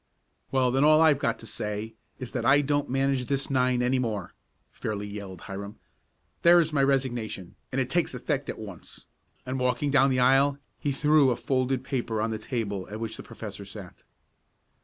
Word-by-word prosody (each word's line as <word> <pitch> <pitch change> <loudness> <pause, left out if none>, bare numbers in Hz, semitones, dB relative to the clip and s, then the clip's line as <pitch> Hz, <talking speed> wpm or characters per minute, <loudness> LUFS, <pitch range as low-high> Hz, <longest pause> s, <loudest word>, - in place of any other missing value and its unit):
"Well, 130 -2 +2
then 135 +2 +2
all 155 +1 +6
I've 155 -3 +5
got 115 - 0
to - - -12
say 105 0 -4 0.2
is 125 -3 -7
that 120 - -2
I 135 +4 +5
don't 145 0 0
manage 135 -1 +1
this 140 0 -1
nine 125 -2 +2
any 130 +1 +2
more!" 105 -7 -3 0.4
fairly 105 -2 -4
yelled 100 -3 -7
Hiram. 100 +1 -7 0.6
"There's 170 -2 +5
my 140 - +3
resignation, 120 -9 -1 0.2
and 135 - -1
it 130 - +1
takes 165 -1 0
effect 140 +2 -2
at - - -4
once!" 100 -5 -9 0.4
and, 130 +1 -3
walking 125 +3 +1
down 135 -1 +5
the 130 -1 +1
aisle 135 +2 +4 0.2
he 145 - -1
threw 150 0 +4
a 125 - +2
folded 130 0 0
paper 120 -5 -2
on 110 +1 0
the 110 - -3
table 105 -5 -3
at 105 +1 -6
which 110 -1 -4
the - - -8
professor 100 -2 -8
sat. 100 -2 -10
125 Hz, 185 wpm, -27 LUFS, 110-135 Hz, 0.6 s, all